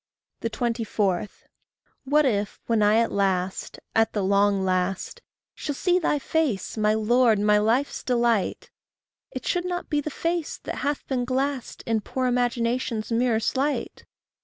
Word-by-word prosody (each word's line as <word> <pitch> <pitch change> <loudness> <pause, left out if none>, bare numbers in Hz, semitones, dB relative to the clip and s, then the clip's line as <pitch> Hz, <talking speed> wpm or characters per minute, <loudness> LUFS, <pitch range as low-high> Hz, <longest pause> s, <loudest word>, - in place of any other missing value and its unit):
24. 220 -5 -1 0.8
What 300 +2 +3
if, 205 -5 -1
when 230 -2 +1
I 210 +1 +4
at 230 0 +2
last, 190 -2 -1 0.2
at 225 0 +3
the 205 - -1
long 200 0 +2
last, 185 - -1 0.3
Shall 290 -2 -4
see 360 +5 +2
thy 300 - +1
face, 285 - -1
my 215 -1 +2
Lord, 230 +1 +3
my 210 +1 +4
life's 235 +7 +1
delight, 235 -5 0 0.6
It - - -7
should 355 -1 0
not 355 0 -4
be 295 -1 +2
the 305 - -4
face 335 +2 -2
that - - -5
hath 290 0 -2
been 255 -2 0
glassed 265 +1 -2
In 225 -2 0
poor 255 +5 -3
imagination's 240 -2 0
mirror 230 -1 +2
slight! 275 +5 -2
235 Hz, 145 wpm, -25 LUFS, 210-275 Hz, 0.8 s, I